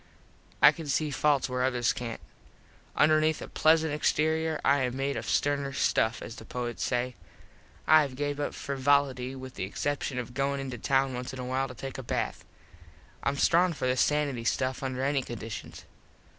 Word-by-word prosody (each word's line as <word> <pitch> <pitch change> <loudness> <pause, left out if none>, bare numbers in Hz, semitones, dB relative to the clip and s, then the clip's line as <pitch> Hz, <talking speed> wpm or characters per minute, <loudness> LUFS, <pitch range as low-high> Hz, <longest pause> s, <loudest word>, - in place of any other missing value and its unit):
I - - +10
can 165 -3 -8
see 150 +2 0
falts 145 -1 +2
where 125 -1 -1
others 125 -2 +1
cant. 115 -2 -5 0.7
Underneath 155 +1 +3
a - - -7
plesant 160 -1 +3
exterior 155 +1 +1
I 140 0 +4
am 125 0 -1
made 140 +1 -1
of - - -4
sterner 140 -1 0
stuff, 110 -3 +1
as 115 - -8
the - - -9
poets 120 +1 -4
say. 125 +1 -1 0.7
I 155 +1 +7
have 140 -3 -3
gave 145 +1 -2
up 145 - -2
frivolity 135 -2 +1
with 130 -1 -8
the - - -4
exception 140 +6 -2
of 125 0 -4
goin 140 +1 0
into 130 -3 -5
town 135 +1 +1
once 125 +1 -5
in 130 - -7
a 125 - -4
while 130 +1 -1
to 125 - -10
take 135 +2 -6
a - - -6
bath. - - -2 0.8
Im 140 - +1
strong 175 +4 +4
for 145 - -4
this 125 -1 +2
sanity 145 -5 +1
stuff 130 +2 -1
under 130 -1 -3
any 140 0 +1
conditions. 115 -3 -7
135 Hz, 185 wpm, -28 LUFS, 125-145 Hz, 0.8 s, I